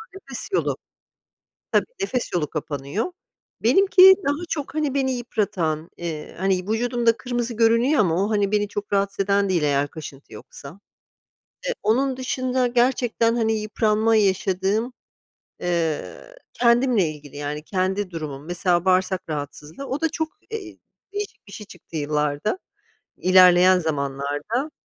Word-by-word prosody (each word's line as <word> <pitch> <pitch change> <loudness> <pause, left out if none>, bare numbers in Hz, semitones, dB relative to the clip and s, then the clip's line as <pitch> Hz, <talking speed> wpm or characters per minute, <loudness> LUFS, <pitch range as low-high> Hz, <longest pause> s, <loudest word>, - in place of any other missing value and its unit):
nefes 275 - -7
yolu - - +1 1.0
tabii - - +4 0.2
nefes 260 -11 -2
yolu 155 -4 +1
kapanıyor. 150 - -3 0.5
Benimki, 380 -1 +7
daha 290 +5 0
çok, 295 -2 -4
hani, 300 -3 -1
beni 265 -1 +1
yıpratan, 180 -9 -2
eee, 165 -3 -6
hani, 190 -1 0
vücudumda 235 0 +1
kırmızı 240 -1 -3
görünüyor 230 +6 +3
ama, 185 -1 +2
o, 215 - -2
hani, 205 -1 +1
beni 205 -1 +1
çok 205 0 -6
rahatsız 195 0 0
eden 200 0 +2
değil, 175 -4 +1
eğer 145 -1 +1
kaşıntı 145 -5 -10
yoksa. 140 - -11 0.9
Eee, - - 0
onun 260 +4 +1
dışında 255 -1 0
gerçekten, 240 -1 +2
hani, 225 -1 +1
yıpranma 215 +1 +1
yaşadığım, 195 +3 +1 0.7
ııı, 170 - -2 0.2
kendimle 235 -6 +3
ilgili, 145 -2 -11
yani, 145 +1 -4
kendi 190 +2 -1
durumum, 150 -3 -6
mesela, 175 0 0
bağırsak 185 0 +2
rahatsızlığı. 150 - -6
O, 270 +2 -3
da 325 - +2
çok, 320 0 -3 0.2
eee, 405 -7 -7 0.3
değişik 410 - -6
bir - - -13
şey 210 0 -9
çıktı 175 -4 -11
yıllarda. 150 - -1 0.6
İlerleyen 185 0 +6
zamanlarda. 145 - -2
200 Hz, 135 wpm, -23 LUFS, 165-245 Hz, 1.0 s, Benimki